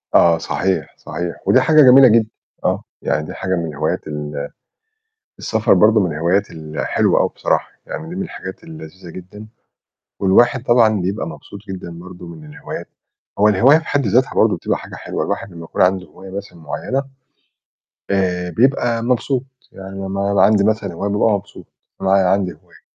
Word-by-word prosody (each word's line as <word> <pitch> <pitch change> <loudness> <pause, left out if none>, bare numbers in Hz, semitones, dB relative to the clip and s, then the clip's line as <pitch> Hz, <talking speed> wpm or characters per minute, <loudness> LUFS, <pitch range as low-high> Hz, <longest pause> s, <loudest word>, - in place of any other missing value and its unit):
آه، 85 -1 +6
صحيح، 95 +3 -2
صحيح. 85 0 -5
ودي 130 - +5
حاجة 155 +2 +5
جميلة 130 0 +8
جدًا. 110 -1 +3 0.4
آه، - - 0 0.2
يعني 75 - -1
دي - - -7
حاجة 95 -1 -2
من 85 -1 -2
الهوايات 75 -2 -3
ال 75 -1 -5 0.9
السفر 110 -1 +2
برضه 105 +4 +5
من 90 -5 0
الهوايات 90 +6 0
الحلوة 80 -1 0
أوي - - +2
بصراحة. - - 0
يعني 160 - -7
دي 175 - -7
من 190 - -3
الحاجات 95 - -8
اللذيذة 95 - -11
جدًا. 95 +5 -11 0.7
والواحد 115 +6 +4
طبعًا 115 -5 +3
بيبقى 95 +2 -2
مبسوط 85 +5 -10
جدًا 95 -2 -6
برضه 90 0 -11
من 80 -2 -11
الهوايات، 75 0 -8 0.5
هو 105 +1 +5
الهواية 120 +9 +5
في 165 - -9
حد 140 -4 0
ذاتها 125 +6 +2
برضه - - +3
بتبقى - - -2
حاجة - - -10
حلوة، - - -4
الواحد 100 - -4
لمّا 85 -1 -9
يكون - - -1
عندُه 90 0 +2
هواية 95 +5 -13
مثلًا 100 -2 -8
معينة، 130 - -3 1.1
آآ، 90 -2 0
بيبقى 120 +3 +1
مبسوط، 125 +1 0 0.3
يعني 95 0 -10
لمّا 100 +1 -2
يبقى 95 -1 +5
عندي 105 -1 +3
مثلًا 105 -3 0
هواية 100 +4 -3
بابقى 105 +2 +2
مبسوط، 100 0 -9 0.4
معايا– 95 -1 +3
عندي 95 -1 +1
هواية. - - -22
95 Hz, 170 wpm, -19 LUFS, 90-115 Hz, 1.1 s, جميلة